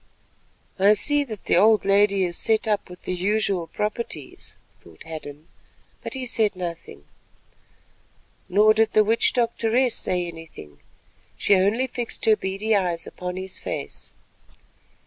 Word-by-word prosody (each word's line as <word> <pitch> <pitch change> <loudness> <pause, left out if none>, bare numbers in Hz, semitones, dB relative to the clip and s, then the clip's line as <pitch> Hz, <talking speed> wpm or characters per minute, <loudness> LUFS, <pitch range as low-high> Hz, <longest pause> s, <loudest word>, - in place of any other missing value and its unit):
"I 200 +2 +6
see 290 +7 +1
that 215 -6 -8
the - - +3
old 215 +2 +4
lady 200 0 +3
is 175 -1 -2
set 220 +3 +1
up 210 -3 -1
with 180 0 -13
the - - -3
usual 195 -1 0
properties," 210 - -5 0.2
thought 80 -2 -16
Hadden, 155 -1 -9 0.5
but - - -6
he 260 -1 -4
said 220 -4 0
nothing. 170 - -7 1.5
Nor 210 +4 +5
did 220 0 +1
the 215 - +5
witch 225 +2 +3
doctoress 235 +1 +1
say 180 -1 -1
anything; 165 - -11 0.6
she - - +3
only 205 +7 +2
fixed 245 -2 -4
her 220 - +5
beady 200 +3 -1
eyes 175 -4 -1
upon 180 0 -6
his 190 0 -6
face. - - -7
200 Hz, 140 wpm, -23 LUFS, 180-220 Hz, 1.5 s, I